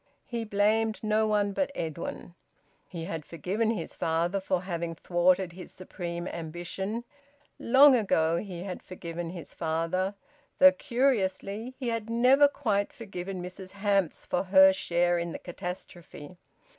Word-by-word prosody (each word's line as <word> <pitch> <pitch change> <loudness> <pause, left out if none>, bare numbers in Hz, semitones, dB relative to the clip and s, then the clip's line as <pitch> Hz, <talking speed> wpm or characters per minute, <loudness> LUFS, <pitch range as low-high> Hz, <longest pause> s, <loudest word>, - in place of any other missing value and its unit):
He 235 -2 -4
blamed 215 +1 +1
no 215 0 +2
one 205 -1 +1
but 280 +6 -1
Edwin. 165 +2 -5 0.5
He 165 -3 -6
had 165 -2 -5
forgiven 185 +9 -2
his 210 -8 -3
father 170 +4 0
for 185 -1 -1
having 170 -2 -3
thwarted 175 +2 +2
his 180 +1 -10
supreme 175 -1 -6
ambition; 175 +7 -5 0.6
long 265 +3 +7
ago 170 -7 +2
he 180 -2 -5
had 190 -2 -6
forgiven 170 -2 -6
his 170 -1 -9
father; 165 +4 -1 0.4
though, 280 0 +9
curiously, 235 -3 -1
he 255 -3 -3
had 230 -1 -3
never 255 +5 +5
quite 215 -8 -1
forgiven 190 -4 -6
Mrs 185 +1 -9
Hamps 200 -4 0
for 180 - -1
her 190 0 +7
share 175 -1 +1
in 170 -1 -3
the - - -4
catastrophe. 175 -2 -8
190 Hz, 140 wpm, -28 LUFS, 175-215 Hz, 0.6 s, though